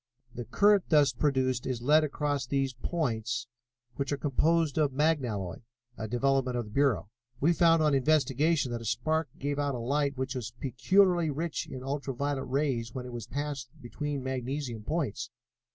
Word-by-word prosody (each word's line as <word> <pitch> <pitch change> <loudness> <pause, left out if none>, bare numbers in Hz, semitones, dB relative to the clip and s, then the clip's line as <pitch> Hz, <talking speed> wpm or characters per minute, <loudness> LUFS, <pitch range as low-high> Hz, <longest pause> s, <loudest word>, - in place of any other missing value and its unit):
The 120 -1 -6
current 205 - +4
thus 145 -4 +5
produced 130 -2 0
is 125 -2 -3
led 150 +4 +5
across 145 -3 -1
these 135 0 0
points, 120 -6 -2 0.5
which 140 0 -2
are 145 - 0
composed 155 +2 +1
of 150 -2 +3
magnalloy, 130 - 0 0.4
a 110 - -5
development 130 +1 +1
of 120 - -2
the 105 - -12
Bureau. 135 -5 +1 0.3
We 165 +5 +4
found 165 -1 +4
on 150 -1 +3
investigation 145 0 +2
that 120 -1 -3
a - - -8
spark 160 +7 0
gave 145 +1 -2
out 145 -2 0
a - - -4
light 140 +3 0
which 130 0 -2
was 120 -3 -5
peculiarly 170 - +3
rich 155 +3 -3
in 130 - -7
ultra 135 -1 -3
violet 140 +1 -2
rays 130 -4 -1
when 125 -1 -4
it 125 - -8
was 120 -2 -6
passed 140 -1 -4
between 140 +3 -4
magnesium 130 -2 -3
points. 145 -1 -2
135 Hz, 170 wpm, -29 LUFS, 125-150 Hz, 0.5 s, thus